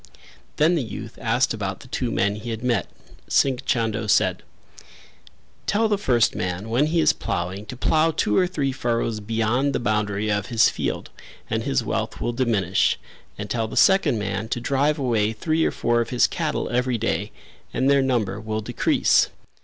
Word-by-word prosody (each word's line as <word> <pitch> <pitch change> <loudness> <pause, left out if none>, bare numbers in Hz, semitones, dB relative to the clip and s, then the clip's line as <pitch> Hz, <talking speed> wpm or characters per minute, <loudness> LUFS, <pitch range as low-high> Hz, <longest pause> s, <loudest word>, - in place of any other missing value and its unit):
Then 155 +4 +3
the 165 - +1
youth 110 -5 -7
asked - - +1
about - - -4
the - - -14
two - - -2
men 100 +1 +1
he 115 +3 -7
had 115 +1 -4
met; 120 -8 +1 0.4
Singh 135 -3 +2
Chando 110 -2 0
said; - - +2 1.3
"Tell 220 +2 +2
the 210 - +2
first 120 - +2
man 90 +4 -3
when 130 +6 +2
he 165 +2 +1
is 160 0 +4
ploughing 95 +4 -4
to 125 - -7
plough 160 +5 +2
two 150 -9 0
or 180 - +4
three 145 -7 -1
furrows 115 -3 -1
beyond 115 +6 0
the - - 0
boundary 105 -2 0
of 105 -1 -1
his 115 -3 +4
field - - -4 0.4
and - - 0
his - - +1
wealth - - -3
will 120 - -2
diminish 105 -7 +1 0.4
and 105 - -5
tell 110 +2 -1
the - - -7
second 190 -11 +4
man 105 0 -3
to 120 - -1
drive 140 +4 +1
away 115 -6 +1
three 155 +8 0
or - - +3
four 120 0 +1
of 115 - -3
his 125 -2 +3
cattle - - -2
every 125 0 +1
day 115 +1 -2 0.4
and 130 - 0
their 140 0 +4
number 110 -6 0
will 110 0 -3
decrease." - - +2
115 Hz, 185 wpm, -23 LUFS, 105-135 Hz, 1.3 s, is